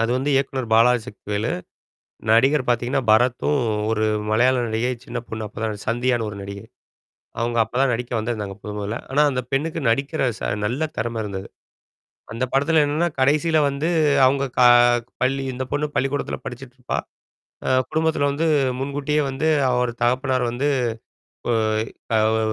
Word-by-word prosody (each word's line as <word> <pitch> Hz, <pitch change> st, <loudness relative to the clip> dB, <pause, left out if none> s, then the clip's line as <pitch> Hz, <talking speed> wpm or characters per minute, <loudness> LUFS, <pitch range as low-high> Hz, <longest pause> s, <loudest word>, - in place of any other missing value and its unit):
அது 115 Hz, -, 0 dB
வந்து 140 Hz, +3 st, -1 dB
இயக்குனர் 135 Hz, -2 st, 0 dB
பாலாஜி 120 Hz, +2 st, +5 dB
சக்திவேலு, 105 Hz, 0 st, -4 dB, 0.8 s
நடிகர் 130 Hz, +4 st, +4 dB
பாத்தீங்கன்னா 120 Hz, +2 st, +1 dB
பரத்தும், 125 Hz, +5 st, +3 dB, 0.3 s
ஒரு 110 Hz, -1 st, +1 dB, 0.3 s
மலையாள 125 Hz, +4 st, +3 dB
நடிகை, 115 Hz, +3 st, -1 dB
சின்ன 120 Hz, +1 st, -5 dB
பொண்ணு 110 Hz, -1 st, -5 dB
அப்ப 105 Hz, -, -14 dB
தான் 110 Hz, -, 0 dB
நடிச் 105 Hz, -1 st, -8 dB
சந்தியான்னு 120 Hz, 0 st, +1 dB
ஒரு 100 Hz, -, -8 dB
நடிகை. 100 Hz, 0 st, -8 dB, 0.8 s
அவுங்க 120 Hz, 0 st, 0 dB
அப்ப 110 Hz, -, -19 dB
தான் 135 Hz, -, +3 dB
நடிக்க 120 Hz, +1 st, -3 dB
வந்திருந்தாங்க, 110 Hz, -3 st, -3 dB
மொத 105 Hz, -, -6 dB
மொதல்ல. 105 Hz, +3 st, -3 dB
ஆனா, 140 Hz, -, +2 dB
அந்த 130 Hz, -2 st, -1 dB
பெண்ணுக்கு 155 Hz, +4 st, -1 dB
நடிக்கிற 140 Hz, +6 st, 0 dB, 0.2 s
ச -, -, -21 dB, 0.2 s
நல்ல 130 Hz, +9 st, 0 dB
திறமை 115 Hz, +1 st, -2 dB
இருந்தது. 100 Hz, -1 st, -6 dB, 0.8 s
அந்த 115 Hz, +3 st, -3 dB
படத்ல 150 Hz, +3 st, +3 dB
என்னான்ன, 155 Hz, +4 st, 0 dB
கடைசில 155 Hz, +4 st, +3 dB
வந்து, 140 Hz, +4 st, -2 dB, 0.4 s
அவுங்க 140 Hz, +1 st, +2 dB
கா 125 Hz, -, +8 dB, 0.5 s
பள்ளி 135 Hz, +1 st, +1 dB
இந்த 130 Hz, +1 st, -3 dB
பொண்ணு 150 Hz, +1 st, 0 dB
பள்ளிக்கூடத்துல 135 Hz, +2 st, -1 dB
படிச்சிட்ருப்பா, 125 Hz, 0 st, -6 dB, 0.7 s
அ -, -, 0 dB, 0.2 s
குடும்பத்தில 160 Hz, -2 st, +1 dB
வந்து, 155 Hz, +4 st, -1 dB, 0.3 s
முன்கூட்டியே 145 Hz, +2 st, -1 dB
வந்து, 135 Hz, +4 st, -1 dB, 0.2 s
அவர் 125 Hz, -1 st, +1 dB
தகப்பனார் 130 Hz, +1 st, +1 dB
வந்து 135 Hz, +5 st, -1 dB, 0.8 s
ஓய் 110 Hz, -1 st, 0 dB, 0.3 s
ஆவ் 110 Hz, +1 st, +2 dB
125 Hz, 150 wpm, -22 LUFS, 115-140 Hz, 0.8 s, கா